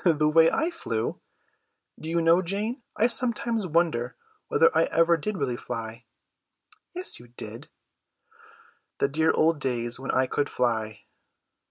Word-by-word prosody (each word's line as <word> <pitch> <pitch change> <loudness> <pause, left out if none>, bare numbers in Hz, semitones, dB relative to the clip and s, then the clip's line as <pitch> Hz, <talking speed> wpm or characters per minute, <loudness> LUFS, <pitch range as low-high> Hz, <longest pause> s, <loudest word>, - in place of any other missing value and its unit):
"The 155 -4 +3
way 160 +1 +6
I 330 +2 0
flew? 335 - -3 0.8
Do 160 - -6
you 170 0 +1
know, 165 +2 +5
Jane, 210 - -3 0.2
I 225 - +4
sometimes 235 -3 0
wonder 155 -7 0 0.3
whether 460 0 +3
I - - +4
ever 165 +1 +3
did 200 +6 -3
really 135 -6 -1
fly." 115 -1 -6 0.9
"Yes, 365 +1 -2
you 120 - -14
did." 120 - -9 1.3
"The - - +2
dear 160 +3 +1
old 160 -1 +3
days 120 -2 -1
when 135 - -7
I 130 - +3
could 145 +3 -1
fly!" 110 -3 -1
160 Hz, 145 wpm, -26 LUFS, 125-205 Hz, 1.3 s, way